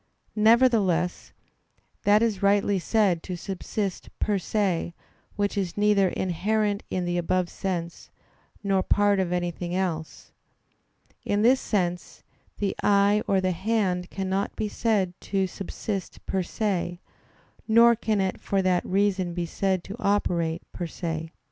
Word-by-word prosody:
Nevertheless, 215 -6 +3 0.7
that 210 +2 +5
is 215 -5 0
rightly 200 0 +3
said 190 -3 +2
to 180 - -5
subsist 195 +1 -4
per 205 -2 0
se, 180 -4 -1 0.4
which 205 0 -1
is 190 -3 -2
neither 205 -2 +4
inherent 205 +4 0
in 180 -1 -2
the 175 0 0
above 175 +1 0
sense, 170 -3 -4 0.5
nor 195 -1 +2
part 205 +1 +2
of 185 -2 0
anything 175 0 -2
else. 170 -4 -3 0.9
In 205 +1 0
this 255 +3 +5
sense, 180 -4 -2 0.3
the 200 -2 -1
eye 205 +1 +4
or 195 - +3
the 185 0 +1
hand 185 -1 0
cannot 195 +1 -2
be 215 - -2
said 205 -4 0
to 195 -1 0
subsist 195 +1 -5
per 190 - 0
se; 180 -2 -2 0.7
nor 235 +1 +6
can 220 -2 -1
it 190 -1 -1
for 195 -1 0
that 180 -1 +2
reason 190 -2 0
be 175 -1 -1
said 190 +1 -1
to 200 - -7
operate 175 -6 0
_per 175 -2 -4
se. 160 -2 -4
195 Hz, 135 wpm, -26 LUFS, 180-205 Hz, 0.9 s, nor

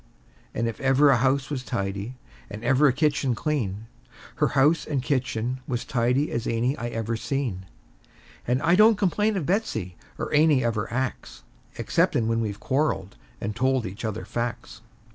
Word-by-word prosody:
And 115 - 0
if 115 - -5
ever 135 +2 +5
a 130 - +4
house 135 +3 +1
was 135 -3 -2
tidy, 100 +1 -3 0.3
and 105 +2 -8
ever 135 +4 +4
a - - +5
kitchen 140 -3 +1
clean, 110 -8 -2 0.5
Her - - +3
house 150 +4 +4
and 140 -4 -2
kitchen 125 -2 -1
was 120 -2 -2
tidy 125 +4 +1
as 115 0 -2
any 120 +4 0
I 120 - -4
ever 115 -1 -3
seen; 115 -7 -3 0.8
And 125 +4 +1
I 170 +1 +4
don't 215 +3 +6
complain 205 +2 +1
of 170 - -2
Betsey, 170 - -1 0.2
or - - -4
any 150 -3 +4
of 115 -1 +1
her 105 -2 -3
acts, 130 +2 -4 0.3
Exceptin' 115 - +1
when 115 0 +1
we've 105 -2 -3
quarreled, 130 -9 -1 0.2
and 105 0 -4
told 130 0 +1
each 100 +4 -7
other 110 -1 -3
facts. 120 0 -4
125 Hz, 170 wpm, -25 LUFS, 115-145 Hz, 0.8 s, don't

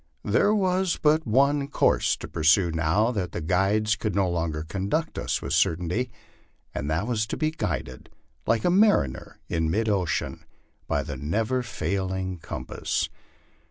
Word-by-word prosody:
There 210 - +3
was 185 -2 +1
but 155 +1 +3
onr 140 +4 +3
course - - +2
to - - -7
pursue 85 +3 +3
now 85 +8 +2
that 100 -7 -3
the - - -3
guides 95 +6 +2
could 105 -4 -3
no 100 -2 +2
longer 85 -3 -2
conduct 100 - -2
us - - -2
with - - -2
certainty 90 +9 +1 0.6
and 70 +3 -3
that 80 +7 0
was 110 -2 -1
to - - -4
be 155 0 0
guided 75 - -4 0.4
like 115 -1 +2
the 175 - +3
mariner 185 - +2
in 80 -2 0
mid 110 +7 0
ocean 95 -8 -1 0.4
by 70 - 0
the 70 -3 -6
never 110 - 0
fail 100 -6 -2
ing 95 -1 -3
compass. 80 - -3
100 Hz, 160 wpm, -26 LUFS, 80-125 Hz, 0.6 s, There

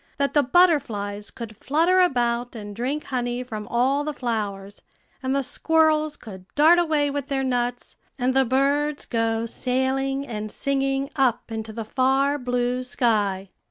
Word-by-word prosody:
that 280 0 0
the 290 - +5
butterflies 240 - +2
could 225 -2 -8
flutter 330 +9 +2
about 245 -7 +1
and 205 -2 -7
drink 265 +7 -2
honey 245 -1 -2
from 215 -4 -7
all 265 +4 +1
the 300 -1 -4
flowers, 205 -5 -4 0.4
and 260 +1 -1
the 275 - +1
squirrels 310 +1 +2
could 190 -5 -11
dart 320 +4 +6
away 305 -4 +1
with 280 -1 -3
their 275 -2 -1
nuts, 245 -1 -2 0.2
and 255 0 +1
the 265 0 +4
birds 280 +3 +1
go 225 -1 0
sailing 265 +3 -1
and 215 -4 -5
singing 275 +2 -1
up 255 -5 +1
into 220 0 -5
the 225 0 -6
far 270 +4 +1
blue 250 0 -1
sky. 205 -6 0
255 Hz, 155 wpm, -24 LUFS, 230-280 Hz, 0.4 s, dart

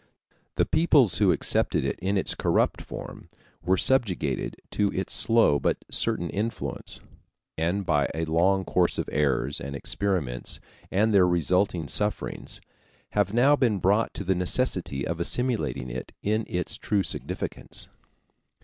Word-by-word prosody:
The - - +2
peoples 145 - +3
who - - +5
accepted - - +1
it - - -2
in 100 +2 0
its 95 - +1
corrupt - - +1
form - - -9 0.3
were 90 +3 +2
subjected 95 - +1 0.2
to 100 -1 +1
its 95 - -3
slow 115 -11 +4
but - - +1
certain 85 - 0
influence, 110 +3 -4 0.5
and 90 +5 -1
by 75 -4 +2
a 80 0 -1
long 90 +4 +2
course 90 -1 +2
of - - -2
errors 70 -1 0
and 70 +2 -5
experiments 75 -7 -2 0.3
and 110 +3 +2
their 95 -3 +6
resultant 90 -1 +1
sufferings 105 -2 -2 0.5
have 100 -2 +1
now 130 +6 +5
been 120 -7 +2
brought 100 +4 +2
to - - -3
the 95 0 +2
necessity 90 - 0
of 85 0 -3
assimilating 95 - -1
it 65 +1 -6
in 110 +1 0
its 90 -4 -3
true 100 -2 0
significance. - - -4
95 Hz, 140 wpm, -26 LUFS, 80-105 Hz, 0.5 s, their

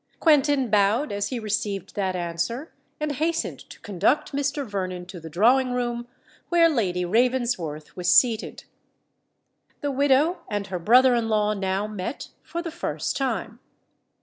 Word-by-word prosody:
Quentin 285 -6 +3
bowed 215 +7 +2
as 200 0 -1
he 255 - -4
received 210 -3 -3
that 190 -2 -1
answer, 180 - -3 0.3
and 305 -1 -1
hastened 320 +4 -1
to - - -14
conduct 205 - 0
Mr. 285 0 -1
Vernon 185 -4 -4
to 180 0 -9
the 165 0 -9
drawing 245 - +3
room 240 -1 -2 0.4
where 340 -1 +5
Lady 185 - 0
Ravensworth 225 - 0
was 180 -1 -1
seated. 230 -1 +3 1.2
The 290 -2 -1
widow 285 +5 +3
and 205 -1 -2
her 185 -2 -4
brother 250 +8 +5
in 230 -2 0
law 210 -1 +2
now 195 0 -1
met 210 +4 -5
for 340 0 -5
the 335 - -5
first 340 - -3
time. 240 -3 -2
230 Hz, 150 wpm, -24 LUFS, 195-270 Hz, 1.2 s, where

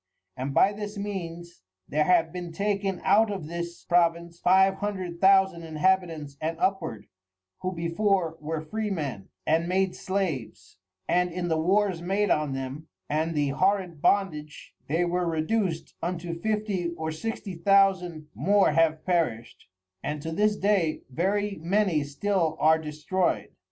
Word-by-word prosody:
And 130 +2 -3
by 195 +8 +4
this 205 0 -6
means, 175 - -6 0.3
there 150 +1 +1
have 170 -3 +3
been 175 -2 -5
taken 200 0 -1
out 215 +3 +4
of 195 -6 -4
this 170 +1 -6
Province 170 -1 +1
Five 190 +2 +4
Hundred 185 -4 -4
Thousand 190 -2 +5
Inhabitants 160 -3 0
and 165 +1 -2
upward, 120 - -1 0.5
who 185 - -2
before 170 0 0
were 155 +1 -3
Freemen, 155 - -4 0.2
and 165 +2 +2
made 190 0 +1
Slaves, 185 - -3 0.3
and 180 0 +2
in 175 0 -3
the 160 -1 +1
Wars 190 0 +2
made 195 +4 0
on 150 -2 +1
them, 135 +4 -5 0.2
and 160 +2 0
the 145 -1 +1
horrid 185 +1 0
Bondage 155 -7 0
they 165 +5 +1
were 175 0 0
reduc'd 165 +2 -1
unto 170 0 -3
Fifty 210 -4 -1
or 160 0 -3
Sixty 200 +4 -5
Thousand 180 -3 +2
more 195 +3 +3
have 160 0 +2
perished, 160 -11 -1 0.3
and 150 +1 -3
to 160 - -4
this 210 +5 +2
day 195 -6 +1
very 195 +5 -1
many 180 -3 +2
still 160 +3 -1
are 160 +1 +5
destroy'd. 155 +4 -1
175 Hz, 140 wpm, -27 LUFS, 160-195 Hz, 0.5 s, Thousand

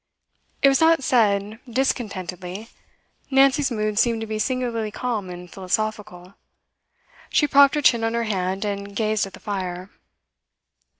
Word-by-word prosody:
It - - +8
was 270 +1 +3
not 325 -3 +4
said 210 -3 +1
discontentedly; 200 -5 -3 0.6
Nancy's 275 +1 +4
mood 215 -3 -1
seemed 230 -2 +2
to - - -3
be 215 0 -4
singularly 240 -3 -1
calm 215 -3 -3
and 180 0 -8
philosophical. 195 0 -4 1.0
She 295 - +3
propped 280 0 +5
her 295 - -1
chin 235 -3 +4
on 225 0 0
her 235 - 0
hand, 190 -2 -2
and 200 0 -5
gazed 215 -2 0
at 195 - -14
the - - -11
fire. 185 -2 -5
215 Hz, 140 wpm, -23 LUFS, 195-245 Hz, 1.0 s, It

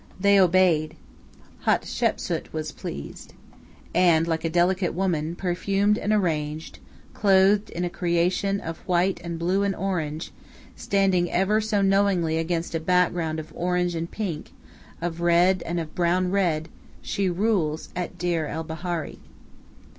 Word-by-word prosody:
They 200 +1 +5
obeyed. 175 -4 +3 0.7
Hatshepsu - - 0
was 155 -1 -4
appeased. 70 - -8 0.6
And, 165 -2 +4
like 160 -1 -1
a 165 - 0
delicate 175 +1 +1
woman, 170 -3 -1
perfumed 195 +3 +1
and 210 - -1
arranged, 160 -6 -1 0.3
clothed 200 +1 +3
in 175 - -4
a 175 - -1
creation 180 +3 0
of 165 -2 -6
white 180 0 +1
and 170 -1 -4
blue 180 +4 +1
and 200 -1 0
orange, 165 -5 -3 0.4
standing 190 -3 +1
ever 205 +4 +2
so 210 -2 0
knowingly 195 -5 +2
against 165 +1 -2
a 165 - 0
background 170 -2 +1
of 155 - -9
orange 180 0 0
and 165 0 -3
pink, 180 -8 -5 0.5
of 170 0 -3
red 175 +2 +4
and 170 +1 -1
of 160 -2 -6
brown 180 +1 +1
red, 170 -5 0 0.3
she 195 -2 -1
rules 175 -5 0
at 180 0 -4
Deir 170 -3 -1
el 160 +2 -4
Bahari. 165 +1 -5
175 Hz, 140 wpm, -25 LUFS, 165-190 Hz, 0.7 s, They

